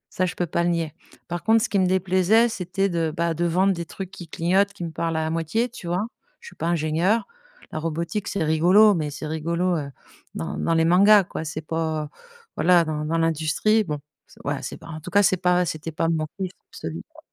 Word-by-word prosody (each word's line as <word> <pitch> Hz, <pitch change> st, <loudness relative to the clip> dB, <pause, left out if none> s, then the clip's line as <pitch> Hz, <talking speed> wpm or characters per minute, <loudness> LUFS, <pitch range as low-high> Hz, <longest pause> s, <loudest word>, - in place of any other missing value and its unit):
Ça, 185 Hz, -, +1 dB
je 180 Hz, -, -5 dB
peux 175 Hz, -, -1 dB
pas 170 Hz, -, -1 dB
le 175 Hz, -, +2 dB
nier. 165 Hz, -3 st, -1 dB, 0.3 s
Par 175 Hz, 0 st, -4 dB
contre, 225 Hz, 0 st, +4 dB
ce -, -, -1 dB
qui 200 Hz, -, +1 dB
me 185 Hz, -, +3 dB
déplaisait, 190 Hz, +5 st, +3 dB
c'était 195 Hz, -3 st, -1 dB
de, 165 Hz, -4 st, -1 dB
bah, 170 Hz, 0 st, +1 dB
de 170 Hz, +2 st, -1 dB
vendre 185 Hz, +3 st, +3 dB
des 170 Hz, -2 st, -5 dB
trucs 190 Hz, +2 st, -7 dB
qui 175 Hz, -3 st, -10 dB
clignotent, 185 Hz, +5 st, +1 dB
qui 200 Hz, -3 st, -8 dB
me 165 Hz, -, -4 dB
parlent 165 Hz, 0 st, -2 dB
à 160 Hz, 0 st, 0 dB
moitié, 165 Hz, +9 st, 0 dB
tu 210 Hz, -6 st, -10 dB
vois? 180 Hz, +5 st, 0 dB, 0.3 s
Je 475 Hz, -, -11 dB
suis -, -, -18 dB
pas 165 Hz, -, -3 dB
ingénieure. 170 Hz, +6 st, +1 dB, 0.5 s
La 155 Hz, -, -3 dB
robotique, 170 Hz, +6 st, -3 dB
c'est 200 Hz, -, -1 dB
rigolo, 180 Hz, +7 st, +5 dB
mais 155 Hz, -5 st, -1 dB
c'est 145 Hz, +2 st, -7 dB
rigolo, 170 Hz, +3 st, -1 dB
heu, 145 Hz, -3 st, -3 dB, 0.5 s
dans 80 Hz, -, -4 dB
dans 165 Hz, -, +1 dB
les 165 Hz, 0 st, +3 dB
mangas, 200 Hz, +4 st, +6 dB
quoi. 175 Hz, -, -6 dB
C'est 155 Hz, 0 st, -4 dB
pas 160 Hz, -2 st, -2 dB, 0.5 s
voilà, 175 Hz, -1 st, +5 dB
dans 150 Hz, -1 st, -3 dB
dans 165 Hz, +2 st, 0 dB
l'industrie. 165 Hz, +7 st, +2 dB
Bon, 150 Hz, -6 st, -3 dB, 0.3 s
c'est -, -, -20 dB
voilà, 145 Hz, 0 st, -2 dB
c'est 125 Hz, -, -6 dB
pas -, -, -13 dB
en 155 Hz, -1 st, -6 dB
tout -, -, -8 dB
cas, 205 Hz, 0 st, +4 dB
c'est 185 Hz, -, +3 dB
pas 180 Hz, 0 st, +2 dB
c'était 160 Hz, 0 st, -4 dB
pas 165 Hz, +1 st, -1 dB
mon 155 Hz, -2 st, 0 dB
kiff 190 Hz, -2 st, -3 dB, 0.2 s
absolu, 80 Hz, 0 st, -6 dB
quoi -, -, -16 dB
170 Hz, 230 wpm, -24 LUFS, 160-190 Hz, 0.5 s, mangas